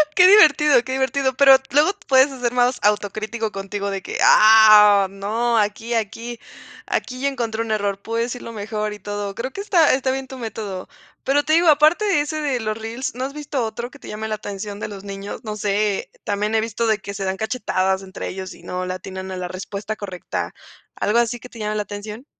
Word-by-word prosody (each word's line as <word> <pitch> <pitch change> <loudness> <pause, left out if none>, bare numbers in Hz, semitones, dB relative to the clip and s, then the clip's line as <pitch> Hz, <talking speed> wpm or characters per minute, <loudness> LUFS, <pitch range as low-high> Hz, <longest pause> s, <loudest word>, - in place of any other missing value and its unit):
Que 360 0 +7
divertido, 300 - +6
que 260 - -6
divertido. 265 0 0
Pero 270 -1 +8 0.2
luego 295 +7 +4 0.2
puedes 265 +1 +5
hacer 250 -3 -2
más 245 +1 +2
autocrítico 215 +2 -1
contigo 200 +1 -4
de 195 -1 -4
que: - - -5
"Ah, 215 -2 +7
no, 220 +5 -1
aquí 220 +3 -1
aquí 230 +2 -4 0.5
aquí 255 -1 -3
ya 280 +2 +1
encontré 230 -4 -3
un 225 - -5
error. 200 -2 -1
Puedo 230 +3 -3
decirlo 240 0 -5
mejor 215 0 -3
y 210 - -10
todo". 205 0 -5
Creo 245 +6 -5
que 395 - -6
está 345 -6 +4
está 260 0 -1
bien 265 0 -4
tu 265 - -9
método. 210 -5 -6 0.4
Pero 280 +2 +2
te 310 - 0
digo, 340 +2 +4
aparte 310 +7 +4
de 390 -8 +2
ese, 310 +1 -3
de 275 -4 -1
los 215 -1 -3
reels, 230 +3 -5
¿no 255 - -4
has 275 +1 -4
visto 290 -3 -3
otro 230 +2 -5
que 285 - -15
te - - -12
llame 215 +1 -5
la 215 - -2
atención 205 0 -7
de - - -5
los 200 -2 -9
niños? 200 0 -7
No 215 -1 -4
sé, 205 0 -1 0.2
también 210 +1 -1
he 220 - +3
visto 230 +1 -2
de 220 -1 +2
que 200 0 -7
se 195 - -5
dan 190 0 -2
cachetadas 190 -4 -1
entre 190 0 -7
ellos, 190 0 -6
si - - -13
no 180 0 -4
le 185 - -3
atinan 190 +1 -7
a 185 - -5
la 180 0 -4
respuesta 200 +3 -6
correcta, 190 -4 -5 0.4
¿algo 220 +3 +1
así, 240 0 0
que 250 - -11
te 235 - -13
llama 210 0 -2
la 210 - -1
atención? 210 +4 -8
220 Hz, 220 wpm, -21 LUFS, 205-260 Hz, 0.5 s, Pero